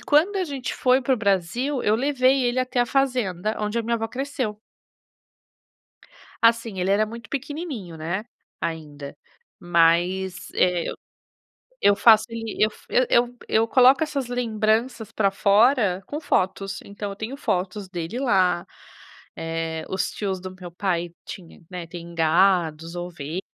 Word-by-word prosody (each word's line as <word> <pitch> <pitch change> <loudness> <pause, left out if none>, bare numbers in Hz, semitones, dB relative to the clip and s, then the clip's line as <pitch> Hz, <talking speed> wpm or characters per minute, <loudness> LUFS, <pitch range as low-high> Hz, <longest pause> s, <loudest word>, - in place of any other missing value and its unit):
quando 325 +8 +3
a 375 - +1
gente 275 -5 -4
foi 255 +1 +3
para 260 +1 +2
o - - -5
Brasil, 225 +7 0
eu 210 - +3
levei 265 0 +2
ele 245 +1 +1
até 255 -1 0
a 245 - +2
fazenda 225 -7 0
onde 210 +2 -1
a - - 0
minha 235 +1 0
avó 225 -1 -1
cresceu. 255 -3 -4 1.8
Assim, 230 -3 +3
ele 180 +1 0
era 205 +2 +3
muito 230 +2 -10
pequenininho, 275 - -5
né, 170 +7 -3 0.3
ainda. 150 -4 -5 0.4
Mas, 175 +2 +2
eh, 180 -2 +2
eu - - -5 0.9
eu 205 - +5
faço 220 +1 +6
ele 225 -2 -6
eu 215 - +4
f - - -19
eu 255 - +3
eu 240 +1 +2
eu 225 +1 +2
coloco 260 +4 +6
essas 290 -5 -2
lembranças 225 -1 -1
pra 200 -3 +2
fora 205 -1 +3
com 295 - -4
fotos, 195 - -1
então 200 0 -6
eu - - -6
tenho 220 +6 -6
fotos 190 -5 -2
dele 175 +5 -5
lá, 185 -9 +2 0.7
eh, 165 -1 -3
os 190 0 -1
tios 190 -3 -3
do 185 0 -7
meu 180 -2 -10
pai 175 -2 -2
tinha, 175 -4 -10
né, 180 -2 -6
tem 170 0 -9
gados, 165 0 +2
ovelhas, 175 -1 -5
210 Hz, 155 wpm, -24 LUFS, 180-245 Hz, 1.8 s, faço